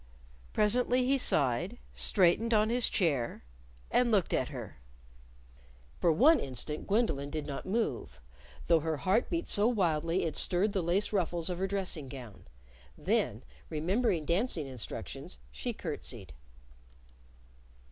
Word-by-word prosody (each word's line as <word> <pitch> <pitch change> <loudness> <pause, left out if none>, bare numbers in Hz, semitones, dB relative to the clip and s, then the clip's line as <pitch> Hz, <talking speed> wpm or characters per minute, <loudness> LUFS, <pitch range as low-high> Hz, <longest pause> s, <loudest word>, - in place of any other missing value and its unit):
Presently 245 +4 +2
he 270 +1 +2
sighed, 155 - +1 0.2
straightened 210 +5 +3
on 215 +1 +3
his 245 0 +3
chair, 140 - 0 0.5
and 250 -1 +3
looked 200 -6 +2
at 130 - +1
her. 120 - -8 1.2
For 170 - +3
one 285 - +5
instant 135 +4 -5
Gwendolyn 195 - 0
did 155 0 -4
not 145 +3 -6
move 200 - -2 0.5
though 170 -1 +4
her 160 0 -2
heart 195 +9 +1
beat 340 0 -2
so 205 +2 +3
wildly 170 -6 +1
that - - 0
it - - -7
stirred 190 +4 +1
the 190 - 0
lace 180 +6 0
ruffles 175 -2 -1
of 175 - -4
her 190 - 0
dressing 185 -7 -2
gown. 125 - -10 0.5
Then, - - 0 0.3
remembering 175 +2 0
dancing 170 - 0
instructions, 125 - -6
she 65 +1 -4
curtsied. - - -5
175 Hz, 135 wpm, -31 LUFS, 150-215 Hz, 1.2 s, one